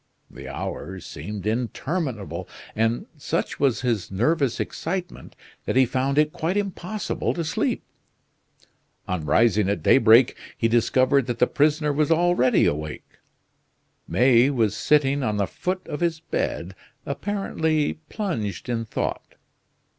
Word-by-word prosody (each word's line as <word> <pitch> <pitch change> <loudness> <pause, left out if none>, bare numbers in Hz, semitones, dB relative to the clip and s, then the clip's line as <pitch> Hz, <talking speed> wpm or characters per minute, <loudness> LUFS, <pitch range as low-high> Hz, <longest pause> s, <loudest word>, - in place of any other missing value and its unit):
The - - -10
hours 95 -1 -6
seemed 105 -2 -7
interminable, 115 - -3 0.3
and 115 +2 0
such 145 - -2
was 135 -4 +2
his 115 -6 -1
nervous 130 - +1
excitement 180 +1 -4 0.3
that - - -1
he 130 0 +6
found 130 +3 -1
it 150 0 +3
quite 175 +5 -1
impossible 200 0 -2
to 170 - -2
sleep. 155 - -1 1.2
On 90 -4 -2
rising 105 +5 +3
at 100 - -1
daybreak 120 0 +6 0.2
he 115 - +2
discovered 130 +3 +3
that 120 -2 -2
the 125 - +4
prisoner 150 +2 +1
was 150 0 +1
already 165 -6 +3
awake. 75 +1 -4 0.9
May 125 +1 +4
was 115 -7 +1
sitting 145 -1 +2
on 110 -5 -1
the 100 - +1
foot 185 - -4
of 150 - -4
his 170 -2 0
bed, 95 - -3 0.3
apparently 160 -1 -1
plunged 120 - -3
in 115 -1 -1
thought. - - -4
130 Hz, 130 wpm, -24 LUFS, 110-155 Hz, 1.2 s, he